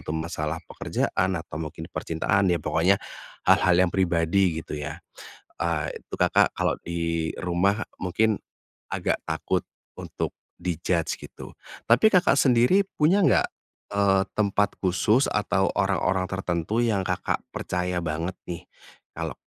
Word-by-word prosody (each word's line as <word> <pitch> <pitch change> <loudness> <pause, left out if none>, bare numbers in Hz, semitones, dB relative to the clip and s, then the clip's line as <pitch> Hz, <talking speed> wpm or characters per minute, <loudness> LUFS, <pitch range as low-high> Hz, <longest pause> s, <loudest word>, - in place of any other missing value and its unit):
itu 80 - -4
masalah 80 -1 -3
pekerjaan 95 0 -1
atau 80 -1 -6
mungkin 80 +1 -6
percintaan 95 +4 0
ya 85 - +3
pokoknya 80 +5 +2 0.5
hal-hal 90 - +5
yang 85 - -1
pribadi 85 -1 +1
gitu 75 - -5
ya, 75 +1 -5 0.6
eee, 85 -3 -1
itu - - -7
Kakak - - +3
kalau - - 0
di 85 -1 -1
rumah 95 +4 +1 0.2
mungkin, 105 +4 +1 0.5
agak - - -1
takut 80 0 -1 0.4
untuk - - -4 0.3
di-judge 85 -1 -1
gitu - - -10 0.3
tapi 120 - +6
Kakak 180 -2 +4
sendiri 125 +9 +4
punya 190 +1 +2
nggak, - - +4 0.5
eee, 95 -1 +4
tempat 100 -1 +1
khusus 95 +8 +3
atau 100 -2 +1
orang-orang 95 -1 +1
tertentu 95 +3 -1
yang 110 -4 +1
Kakak - - -1
percaya 90 0 -2
banget 80 +3 -3
nih 85 -1 -5 0.5
kalau - - -4
90 Hz, 130 wpm, -25 LUFS, 85-100 Hz, 0.6 s, tapi